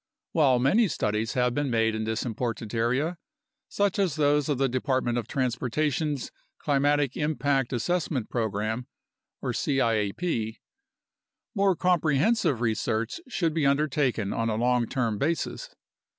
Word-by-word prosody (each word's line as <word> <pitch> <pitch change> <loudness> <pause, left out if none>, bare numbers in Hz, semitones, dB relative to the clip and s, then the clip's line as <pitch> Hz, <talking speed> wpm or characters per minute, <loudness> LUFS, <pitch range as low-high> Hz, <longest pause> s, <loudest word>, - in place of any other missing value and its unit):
While 140 -6 +4
many 195 - +3
studies 110 - -1
have 125 -1 +1
been 145 +1 -1
made 115 -2 +2
in 110 0 -2
this 110 +2 -2
important 115 -1 -3
area, 130 +9 0 0.5
such 205 -1 0
as 185 -7 +1
those 145 -1 +2
of 145 - +1
the 135 +1 +2
Department 130 -1 0
of 115 - -6
Transportation's 135 +3 -1 0.3
Climatic 145 -1 +1
Impact 140 -3 0
Assessment 145 -1 -1
Program 110 +1 -2 0.6
(ciap), 115 - 0 1.0
more 195 -3 +3
comprehensive 165 - +2
research 110 - -1
should 170 -10 -1
be 155 -3 +2
undertaken 140 -7 +1
on 115 0 -1
a 110 - 0
long 120 +1 +1
term 115 -6 -1
basis. 170 - -2
130 Hz, 125 wpm, -27 LUFS, 115-150 Hz, 1.0 s, While